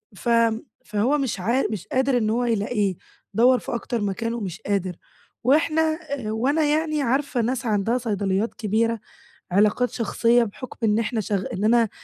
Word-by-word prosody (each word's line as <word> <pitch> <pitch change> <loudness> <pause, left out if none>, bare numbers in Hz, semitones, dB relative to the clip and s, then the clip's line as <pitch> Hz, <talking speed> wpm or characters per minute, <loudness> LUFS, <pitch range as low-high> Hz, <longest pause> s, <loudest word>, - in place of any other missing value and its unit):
ف 235 - -4 0.6
فهو 220 +8 +1
مش 265 -8 -2
عا 235 +8 +1
مش 200 -5 -5
قادر 260 0 +1
إن 215 -3 +1
هو 240 +3 +1
يلاقيه، 210 -3 0 0.4
دوَّر 250 +2 +5
في - - -5
أكتر 235 -1 -3
مكان 205 +3 -2
ومش 200 -4 -5
قادر، 195 -4 -1 0.5
وإحنا 310 +4 +3 0.3
آآ 250 -7 -3
وأنا 275 +8 +1
يعني 305 0 +1
عارفة 270 0 0
ناس 250 +2 -1
عندها 220 +2 +1
صيدليات 205 -2 -1
كبيرة، 225 +1 0 0.5
علاقات 210 +6 +3
شخصية 235 0 +2
بحكم 230 +4 -8
إن 215 0 +3
إحنا 225 0 -1
شغ 195 -1 -1
إن 190 - -3
أنا 230 -1 +4
230 Hz, 160 wpm, -24 LUFS, 210-255 Hz, 0.6 s, دوَّر